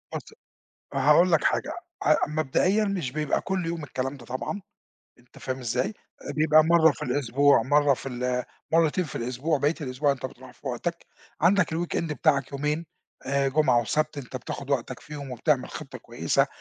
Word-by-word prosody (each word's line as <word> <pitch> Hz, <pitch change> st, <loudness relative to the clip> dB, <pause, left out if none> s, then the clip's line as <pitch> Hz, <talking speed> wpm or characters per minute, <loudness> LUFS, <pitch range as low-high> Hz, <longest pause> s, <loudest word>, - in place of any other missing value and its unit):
بُص -, -, -7 dB, 0.6 s
هاقول 170 Hz, +5 st, +5 dB
لك 160 Hz, -, +4 dB
حاجة، 300 Hz, -, +1 dB, 0.3 s
أ 155 Hz, -, +5 dB
مبدئيًا 155 Hz, +8 st, +1 dB
مش 185 Hz, -10 st, -2 dB
بيبقى 150 Hz, 0 st, 0 dB
كُلّ 190 Hz, -3 st, -2 dB
يوم 165 Hz, -2 st, -3 dB
الكلام 135 Hz, 0 st, -3 dB
ده 120 Hz, -, -13 dB
طبعًا 130 Hz, -, -4 dB, 0.6 s
أنت 120 Hz, -, -21 dB
فاهم 130 Hz, 0 st, -4 dB
إزاي؟ 125 Hz, +1 st, 0 dB
آآ 205 Hz, -8 st, -10 dB
بيبقى 155 Hz, +1 st, +5 dB
مَرّة 160 Hz, -1 st, +5 dB
في 125 Hz, -, -12 dB
الأسبوع، 140 Hz, +1 st, +3 dB
مَرّة 145 Hz, +1 st, +4 dB
في 135 Hz, -, -6 dB
ال 125 Hz, 0 st, -1 dB, 0.3 s
مرتين 165 Hz, +2 st, +3 dB
في 150 Hz, -, -9 dB
الأسبوع، 130 Hz, +6 st, -1 dB
بقيت 150 Hz, +4 st, 0 dB
الأسبوع 140 Hz, +2 st, 0 dB
أنت 130 Hz, -1 st, -3 dB
بتروح 130 Hz, 0 st, -10 dB
في 140 Hz, -, -9 dB
وقتك، 170 Hz, +8 st, -3 dB, 0.4 s
عندك 180 Hz, -1 st, +4 dB
الWeekend 165 Hz, -2 st, -2 dB
بتاعك 140 Hz, -4 st, +1 dB
يومين، 150 Hz, +4 st, -1 dB, 0.4 s
آآ 140 Hz, +1 st, +1 dB
جمعة 135 Hz, -4 st, +3 dB
وسَبت 150 Hz, +6 st, -1 dB
أنت 130 Hz, -1 st, -7 dB
بتاخد 140 Hz, +3 st, -7 dB
وقتك 130 Hz, -1 st, -1 dB
فيهم، 145 Hz, -3 st, -8 dB
وبتعمل 125 Hz, -, 0 dB
خطة -, -, -8 dB
كويسة -, -, 0 dB
145 Hz, 170 wpm, -26 LUFS, 130-160 Hz, 0.6 s, هاقول